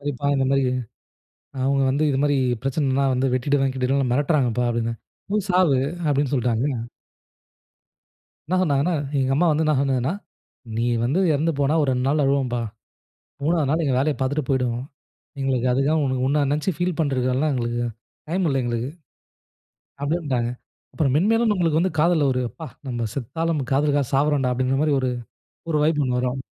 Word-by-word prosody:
சரிப்பா 140 Hz, -1 st, -3 dB
இந்த 135 Hz, -1 st, +1 dB
மாரி, 135 Hz, -1 st, +2 dB, 1.0 s
அவங்க 135 Hz, +1 st, +2 dB
வந்து 145 Hz, +3 st, +1 dB
"இது 135 Hz, -, 0 dB
மாரி 145 Hz, -1 st, +2 dB, 0.3 s
பிரச்சனைனா 135 Hz, 0 st, 0 dB
வந்து 130 Hz, +1 st, +1 dB
வெட்டிடுவே 135 Hz, +1 st, +1 dB
கிட்டிடுவேனு 130 Hz, 0 st, 0 dB
மிரட்றாங்கப்பா" 130 Hz, -4 st, +1 dB
அப்டினே. 115 Hz, 0 st, -1 dB, 0.4 s
"போய் 210 Hz, -2 st, 0 dB
சாவு" 180 Hz, -7 st, +4 dB, 0.3 s
அப்டின்னு 140 Hz, -1 st, +1 dB
சொல்ட்டாங்க. 120 Hz, 0 st, 0 dB, 1.6 s
என்ன 185 Hz, -, 0 dB
சொன்னாங்கன்னா, 150 Hz, +1 st, +1 dB, 0.2 s
எங்க 135 Hz, 0 st, +1 dB
அம்மா 175 Hz, +3 st, +3 dB
வந்து 155 Hz, +2 st, +1 dB
என்ன 155 Hz, -, +3 dB
சொன்னாங்கன்னா, 135 Hz, +1 st, 0 dB, 0.7 s
"நீ 115 Hz, -, +1 dB, 0.2 s
வந்து 140 Hz, +10 st, +1 dB
எறந்து 160 Hz, +4 st, +1 dB
போனா 140 Hz, +2 st, +2 dB
ஒரு 140 Hz, -, +1 dB
2 125 Hz, 0 st, 0 dB
நாள் 150 Hz, +1 st, +2 dB
அழுவோம்பா. 135 Hz, -3 st, +1 dB, 0.8 s
3 165 Hz, +2 st, +2 dB
நாள் 160 Hz, +3 st, +1 dB
எங்க 135 Hz, -3 st, +1 dB
வேலைய 145 Hz, +2 st, +1 dB
பார்த்துட்டு 140 Hz, +3 st, 0 dB
போயிடுவோம். 125 Hz, -2 st, 0 dB, 0.6 s
எங்களுக்கு 130 Hz, -2 st, 0 dB
அதுக்காக 140 Hz, +4 st, +2 dB, 0.3 s
உன்ன 145 Hz, +1 st, +2 dB
நெனச்சு 150 Hz, +6 st, 0 dB
ஃபீல் 175 Hz, -1 st, -1 dB
பண்ணுறதுக்குலா 135 Hz, 0 st, +1 dB
எங்களுக்கு 120 Hz, -1 st, -1 dB, 0.5 s
டைம் 180 Hz, +1 st, 0 dB
இல்ல 135 Hz, -1 st, +1 dB
எங்களுக்கு" 120 Hz, +1 st, -2 dB, 1.1 s
அப்டினுடாங்க. 140 Hz, -7 st, -1 dB, 0.4 s
அப்புறம் 140 Hz, -5 st, +1 dB
மென்மேலும் 225 Hz, +6 st, +3 dB
நம்மளுக்கு 165 Hz, -4 st, +1 dB
வந்து 185 Hz, -3 st, 0 dB
காதல்ல 160 Hz, -3 st, +3 dB
ஒரு 125 Hz, -, 0 dB
அப்பா! 160 Hz, -2 st, -9 dB, 0.2 s
நம்ம 120 Hz, -2 st, -2 dB
செத்தாலும் 160 Hz, +4 st, -2 dB
காதலுக்காக 145 Hz, -1 st, +2 dB
சாவரேண்டா! 140 Hz, -2 st, +2 dB
அப்டிங்கிற 130 Hz, +2 st, 0 dB
மாரி 150 Hz, -2 st, +2 dB
ஒரு 130 Hz, -1 st, 0 dB, 0.6 s
ஒரு 150 Hz, -, +2 dB
வைப் 150 Hz, -1 st, +2 dB
ஒண்ணு 125 Hz, -1 st, 0 dB
வரும் 130 Hz, +1 st, -2 dB
140 Hz, 150 wpm, -23 LUFS, 130-155 Hz, 1.6 s, சாவு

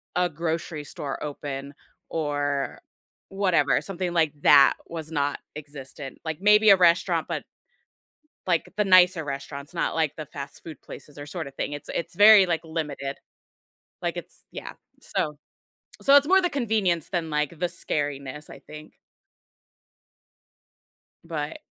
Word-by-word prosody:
a 180 Hz, -1 st, +2 dB
grocery 160 Hz, -1 st, -3 dB
store 140 Hz, -1 st, -6 dB
open 140 Hz, -1 st, -6 dB, 0.4 s
or 145 Hz, -3 st, -2 dB, 0.5 s
whatever, 195 Hz, -3 st, +2 dB
something 185 Hz, -2 st, -4 dB
like 160 Hz, -3 st, +2 dB
that 140 Hz, -2 st, +7 dB
was 165 Hz, -1 st, -7 dB
not 145 Hz, -2 st, -1 dB, 0.2 s
existent. 140 Hz, -2 st, -8 dB
Like 160 Hz, -2 st, -4 dB
maybe 210 Hz, +1 st, +6 dB
a 195 Hz, -, +8 dB
restaurant, 175 Hz, -1 st, +3 dB
but -, -, -3 dB, 1.0 s
like 170 Hz, -3 st, 0 dB
the 210 Hz, -, +2 dB
nicer 180 Hz, -3 st, +6 dB
restaurants, 140 Hz, +2 st, -6 dB
not 175 Hz, -, -1 dB
like 160 Hz, -3 st, 0 dB
the 155 Hz, -, -6 dB
fast 140 Hz, -1 st, -8 dB
food 160 Hz, -5 st, -10 dB
places 145 Hz, -, -12 dB
or 145 Hz, -, -7 dB
sort 165 Hz, 0 st, -5 dB
of 135 Hz, -, -12 dB
thing, 145 Hz, -, -3 dB
it's 145 Hz, 0 st, -8 dB
it's 170 Hz, -, -4 dB
very 205 Hz, 0 st, +8 dB
like 165 Hz, -2 st, -1 dB
limited, 150 Hz, -4 st, -4 dB, 0.8 s
like -, -, -2 dB
it's, -, -, -9 dB
yeah, -, -, -7 dB, 0.3 s
so 150 Hz, -1 st, -2 dB, 0.7 s
so 280 Hz, +1 st, +7 dB
it's 285 Hz, 0 st, +5 dB
more 380 Hz, +3 st, +5 dB
the 355 Hz, -, +1 dB
convenience 210 Hz, -, 0 dB
than 170 Hz, -4 st, -2 dB
like 150 Hz, -1 st, 0 dB
the 180 Hz, -, +1 dB
scariness, 145 Hz, -3 st, -4 dB
I -, -, -10 dB
think. 155 Hz, 0 st, -11 dB, 2.3 s
But 155 Hz, -3 st, -5 dB
160 Hz, 145 wpm, -25 LUFS, 145-180 Hz, 2.3 s, a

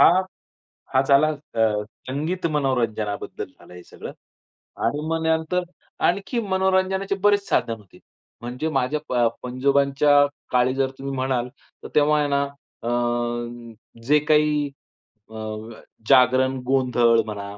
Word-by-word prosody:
हा, 185 Hz, +3 st, +6 dB, 0.7 s
हा 130 Hz, -, +5 dB
झाला 140 Hz, +2 st, +5 dB
अ, 115 Hz, -8 st, -1 dB, 0.2 s
संगीत 155 Hz, +7 st, -3 dB
मनोरंजनाबद्दल 115 Hz, -8 st, -1 dB
झालं -, -, -15 dB
हे 90 Hz, -, -11 dB
सगळं. -, -, -9 dB, 0.7 s
आणि 145 Hz, +1 st, 0 dB
मग 165 Hz, 0 st, -1 dB
त्यानंतर 160 Hz, +3 st, +1 dB, 0.4 s
आणखी 200 Hz, +7 st, -1 dB
मनोरंजनाचे 190 Hz, 0 st, +1 dB
बरेच 205 Hz, -1 st, +3 dB
साधन -, -, +1 dB
होते. 100 Hz, -4 st, -19 dB, 0.4 s
म्हणजे 125 Hz, +6 st, -3 dB
माझ्या 135 Hz, +1 st, 0 dB
प -, -, -2 dB, 0.3 s
पंजोबांच्या 140 Hz, +3 st, +3 dB, 0.3 s
काळी 125 Hz, +1 st, +3 dB
जर 135 Hz, -1 st, +1 dB
तुम्ही 135 Hz, 0 st, -4 dB
म्हणाल 130 Hz, -1 st, -1 dB, 0.3 s
तर -, -, -6 dB
तेव्हा 150 Hz, 0 st, +4 dB
आहे 145 Hz, -, +1 dB
ना 140 Hz, 0 st, +2 dB, 0.4 s
अ, 115 Hz, -, -4 dB, 1.2 s
जे 150 Hz, +1 st, +5 dB
काही 150 Hz, -1 st, +3 dB, 0.6 s
अ, -, -, -11 dB, 0.7 s
जागरण, 130 Hz, 0 st, +5 dB
गोंधळ 125 Hz, -3 st, +3 dB
म्हणा 100 Hz, -1 st, -7 dB
140 Hz, 125 wpm, -23 LUFS, 125-155 Hz, 1.2 s, हा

